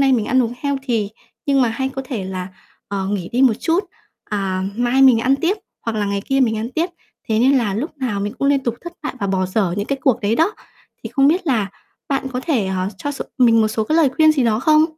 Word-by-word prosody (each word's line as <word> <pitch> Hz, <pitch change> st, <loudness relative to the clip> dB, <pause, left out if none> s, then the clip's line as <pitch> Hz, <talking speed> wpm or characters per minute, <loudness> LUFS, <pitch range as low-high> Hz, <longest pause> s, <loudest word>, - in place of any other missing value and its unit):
nay 270 Hz, -1 st, +4 dB
mình 230 Hz, -4 st, +2 dB
ăn 260 Hz, 0 st, +3 dB
uống 235 Hz, +1 st, -3 dB
healthy, 270 Hz, -7 st, -1 dB, 0.4 s
nhưng 275 Hz, -1 st, +3 dB
mà 245 Hz, -, +3 dB
hay 265 Hz, +4 st, -2 dB
có 270 Hz, 0 st, -5 dB
thể 240 Hz, -8 st, -4 dB
là, 185 Hz, -1 st, -5 dB, 0.4 s
ờ, 195 Hz, -1 st, -2 dB
nghỉ 195 Hz, -4 st, -2 dB
đi 250 Hz, +3 st, +2 dB
một 250 Hz, -4 st, +5 dB
chút, 350 Hz, +4 st, +1 dB, 0.4 s
à, 195 Hz, -3 st, -2 dB
mai 245 Hz, +3 st, +2 dB
mình 255 Hz, -4 st, +7 dB
ăn 265 Hz, +3 st, +3 dB
tiếp 350 Hz, +8 st, 0 dB, 0.3 s
hoặc 225 Hz, -1 st, -3 dB
là 205 Hz, -, +1 dB
ngày 200 Hz, 0 st, -2 dB
kia 270 Hz, 0 st, +1 dB
mình 225 Hz, -4 st, +2 dB
ăn 225 Hz, +3 st, -4 dB
tiếp." 330 Hz, +4 st, 0 dB, 0.4 s
Thế 220 Hz, 0 st, +2 dB
nên 265 Hz, +3 st, +4 dB
là 210 Hz, -5 st, -1 dB
lúc 290 Hz, +6 st, -4 dB
nào 225 Hz, -7 st, -2 dB
mình 205 Hz, +1 st, -2 dB
cũng 275 Hz, -, +1 dB
liên 280 Hz, -1 st, +3 dB
tục 235 Hz, -1 st, 0 dB
thất 345 Hz, 0 st, -8 dB
bại 300 Hz, -, -4 dB
và 200 Hz, -, 0 dB
bỏ 190 Hz, -1 st, 0 dB
dở 185 Hz, -2 st, 0 dB
những 205 Hz, -, -2 dB
cái 275 Hz, -1 st, -2 dB
cuộc 260 Hz, -5 st, +2 dB
đấy 215 Hz, +2 st, +1 dB
đó. 335 Hz, +7 st, +2 dB, 0.5 s
Thì -, -, -5 dB
không 275 Hz, +1 st, +4 dB
biết 355 Hz, +3 st, +1 dB
là 220 Hz, -8 st, +1 dB, 0.4 s
bạn 270 Hz, -1 st, -1 dB
có 250 Hz, -, -2 dB
thể, 260 Hz, -, 0 dB
ờ, 190 Hz, 0 st, -1 dB
cho 290 Hz, -, -3 dB
s -, -, -9 dB, 0.2 s
mình 230 Hz, -3 st, +5 dB
một 215 Hz, -, +3 dB
số 215 Hz, 0 st, -1 dB
cái 310 Hz, -, +1 dB
lời 320 Hz, -4 st, +5 dB
khuyên 310 Hz, +3 st, +5 dB
gì 275 Hz, -4 st, +1 dB
đó 220 Hz, -1 st, +2 dB
không? 310 Hz, +2 st, +5 dB
245 Hz, 265 wpm, -20 LUFS, 210-275 Hz, 0.5 s, mình